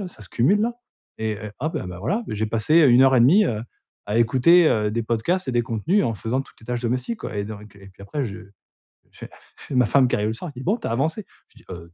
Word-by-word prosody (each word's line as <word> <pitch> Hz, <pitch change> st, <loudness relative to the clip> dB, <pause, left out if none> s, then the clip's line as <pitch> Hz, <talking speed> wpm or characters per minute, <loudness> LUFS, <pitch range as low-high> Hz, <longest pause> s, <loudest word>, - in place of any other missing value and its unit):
là, 195 Hz, -, -5 dB
ça 140 Hz, -, -13 dB
se 95 Hz, -, -10 dB
cumule 185 Hz, -, +2 dB
là 235 Hz, +2 st, 0 dB, 0.4 s
et 110 Hz, 0 st, -2 dB
et 105 Hz, 0 st, -7 dB
hop! 155 Hz, +4 st, -2 dB
Et -, -, -3 dB
bah 90 Hz, -1 st, -8 dB
voilà. 205 Hz, -, -1 dB
J'ai 110 Hz, +1 st, -2 dB
passé 115 Hz, +10 st, +2 dB
heu 145 Hz, -, +6 dB
1:30, 130 Hz, -, +5 dB
heu, 110 Hz, -5 st, -2 dB, 0.4 s
à 105 Hz, +3 st, 0 dB
écouter, 135 Hz, +9 st, +5 dB
heu, 105 Hz, -1 st, +1 dB
des 115 Hz, +2 st, -2 dB
podcasts 130 Hz, +12 st, -1 dB
et -, -, -1 dB
des 120 Hz, 0 st, +2 dB
contenus 130 Hz, -, 0 dB
en 115 Hz, -, 0 dB
faisant 115 Hz, +7 st, -2 dB
toutes -, -, -21 dB
les 110 Hz, -, -17 dB
tâches 125 Hz, 0 st, -3 dB
domestiques, 125 Hz, -, -2 dB
quoi. 120 Hz, -4 st, -6 dB
Et 100 Hz, -, -2 dB
donc, 105 Hz, -1 st, -10 dB
et 100 Hz, 0 st, -15 dB
puis 95 Hz, +1 st, -16 dB
après 135 Hz, +8 st, -3 dB
je 100 Hz, -3 st, -7 dB, 0.8 s
je -, -, -19 dB, 0.4 s
fais 140 Hz, -, -8 dB
ma 125 Hz, -1 st, +4 dB
femme 130 Hz, +4 st, +3 dB
qui -, -, +1 dB
arrive 105 Hz, -, -1 dB
le -, -, -2 dB
soir 160 Hz, +9 st, -7 dB
et -, -, -24 dB
qui 125 Hz, -, -10 dB
dit: -, -, -8 dB
«Bon 210 Hz, +6 st, +1 dB
tu 225 Hz, -, -6 dB
as -, -, -3 dB
avancé?». 155 Hz, -, -1 dB, 0.2 s
Je -, -, -30 dB
dis: -, -, -18 dB
«Heu» 85 Hz, -2 st, -10 dB
120 Hz, 275 wpm, -23 LUFS, 105-155 Hz, 0.8 s, heu